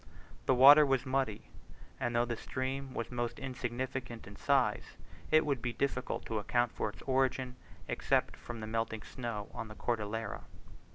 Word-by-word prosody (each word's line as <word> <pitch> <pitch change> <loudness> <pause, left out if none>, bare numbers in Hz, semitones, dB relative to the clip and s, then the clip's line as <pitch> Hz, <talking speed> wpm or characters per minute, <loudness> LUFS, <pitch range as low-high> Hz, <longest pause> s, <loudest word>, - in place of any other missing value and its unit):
The 130 - +5
water 140 +4 +10
was 135 -2 +1
muddy, 130 -5 -1 0.5
and 120 0 -1
though 120 +1 +3
the 120 -1 -2
stream 130 +3 -4
was 115 - -3
most 120 -1 -2
insignificant 130 -2 -4
in 100 - -11
size, - - +1 0.3
it 155 0 +5
would 140 -5 0
be 120 -1 -2
difficult 130 -1 -2
to 110 -2 -2
account 120 +3 +1
for 110 - -2
its 105 - -12
origin, 130 -1 +1 0.3
except - - +1
from 120 -2 -8
the - - -4
melting 110 0 -2
snow 115 -5 -5
on 115 - -5
the 110 - -10
Cordillera. 115 -1 -3
120 Hz, 165 wpm, -33 LUFS, 115-130 Hz, 0.5 s, water